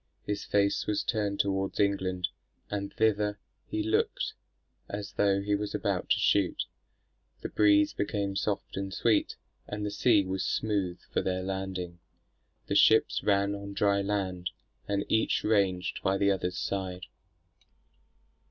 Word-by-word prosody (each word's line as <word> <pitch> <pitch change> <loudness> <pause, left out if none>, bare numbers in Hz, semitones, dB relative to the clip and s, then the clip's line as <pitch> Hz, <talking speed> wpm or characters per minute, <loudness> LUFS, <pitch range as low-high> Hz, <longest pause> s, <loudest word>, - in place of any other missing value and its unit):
His 105 - -2
face 100 -1 +1
was 105 - 0
turned 105 -3 -1
towards 95 -1 0
England, 95 -3 +1 0.4
and 100 -1 -3
thither 105 -2 +1 0.3
he 105 - -2
looked, 110 +1 0 0.6
as 100 0 -5
though 100 0 +2
he 105 0 0
was 105 0 -1
about - - -1
to - - +4
shoot. 100 -3 +2 0.8
The - - -4
breeze 100 -1 +4
became 100 -1 -2
soft 100 0 -2
and 95 0 -3
sweet, 110 +2 +1 0.3
and 105 0 -4
the 105 - -2
sea 105 -1 +3
was 95 0 -2
smooth 100 -5 -1
for - - +1
their 95 0 -1
landing. 95 -2 -4 0.7
The - - -2
ships - - +5
ran 100 0 +2
on 100 0 -6
dry 100 0 +2
land, 95 -3 -2 0.4
and 100 0 0
each 110 - +2
ranged 95 -4 +1
by 95 0 +1
the 100 0 +3
other's 90 -2 -1
side. 95 -2 -3
100 Hz, 145 wpm, -29 LUFS, 95-105 Hz, 0.8 s, ships